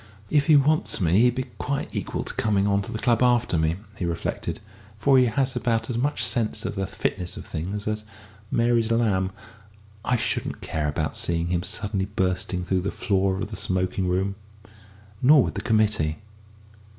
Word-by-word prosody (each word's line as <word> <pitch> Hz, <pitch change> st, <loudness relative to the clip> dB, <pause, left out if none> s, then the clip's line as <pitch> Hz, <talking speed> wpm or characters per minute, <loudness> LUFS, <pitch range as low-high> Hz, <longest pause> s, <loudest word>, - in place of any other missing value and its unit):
"If 145 Hz, -2 st, +3 dB
he 155 Hz, -, +7 dB
wants 150 Hz, +3 st, +3 dB
me 90 Hz, +1 st, +3 dB
he'd 125 Hz, +1 st, +4 dB
be 130 Hz, -, -2 dB
quite 140 Hz, -1 st, -3 dB
equal -, -, -2 dB
to -, -, -6 dB
coming 100 Hz, -2 st, +1 dB
on 100 Hz, 0 st, +2 dB
to 95 Hz, -, -6 dB
the -, -, -3 dB
club 120 Hz, 0 st, +2 dB
after 120 Hz, -6 st, +3 dB
me," 80 Hz, 0 st, +1 dB, 0.2 s
he 90 Hz, -, -2 dB
reflected, 85 Hz, -1 st, -3 dB, 0.4 s
"for 130 Hz, +5 st, +4 dB
he 125 Hz, -, +5 dB
has 130 Hz, +3 st, 0 dB
about 115 Hz, 0 st, 0 dB
as 115 Hz, -, -2 dB
much 145 Hz, +4 st, 0 dB
sense 115 Hz, -3 st, 0 dB
of -, -, -2 dB
the 95 Hz, -2 st, -2 dB
fitness 95 Hz, -3 st, -3 dB
of -, -, -8 dB
things 100 Hz, +7 st, -4 dB
as 105 Hz, 0 st, -2 dB, 0.5 s
Mary's 115 Hz, -1 st, +2 dB
lamb. 100 Hz, -5 st, +1 dB, 0.7 s
I 125 Hz, -, +1 dB
shouldn't -, -, -2 dB
care 75 Hz, -2 st, -2 dB
about 75 Hz, +1 st, -2 dB
seeing 85 Hz, 0 st, 0 dB
him 85 Hz, -1 st, 0 dB
suddenly 100 Hz, 0 st, -1 dB
bursting 90 Hz, -2 st, -1 dB
through 95 Hz, 0 st, +1 dB
the 100 Hz, -, -2 dB
floor 95 Hz, -1 st, 0 dB
of 105 Hz, +2 st, -4 dB
the -, -, -4 dB
smoking 95 Hz, 0 st, -1 dB
room. 95 Hz, +2 st, 0 dB, 0.9 s
Nor 140 Hz, +1 st, +7 dB
would -, -, -3 dB
the 100 Hz, -, -4 dB
committee." 105 Hz, -8 st, +1 dB
105 Hz, 185 wpm, -25 LUFS, 95-120 Hz, 0.9 s, he